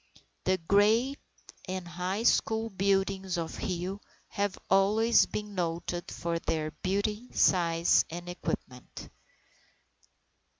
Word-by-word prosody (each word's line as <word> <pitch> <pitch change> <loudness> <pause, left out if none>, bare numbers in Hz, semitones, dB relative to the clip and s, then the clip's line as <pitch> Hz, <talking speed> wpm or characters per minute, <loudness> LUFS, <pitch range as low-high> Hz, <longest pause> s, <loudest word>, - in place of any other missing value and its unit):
The 185 0 +3
grade 215 +10 +3 0.5
and 185 -1 -4
high 180 +5 -3
school 225 -1 +2
buildings 195 -1 0
of 165 -1 -4
Rio 190 0 -3 0.3
have 200 -1 -2
always 210 +4 +4
been 210 -1 -5
noted 175 -1 -3
for 170 0 -3
their 155 -2 -2
beauty, 205 +8 -2
size, 170 -2 +4
and 175 +1 -7
equipment. 130 -7 -6
190 Hz, 100 wpm, -29 LUFS, 175-205 Hz, 0.5 s, always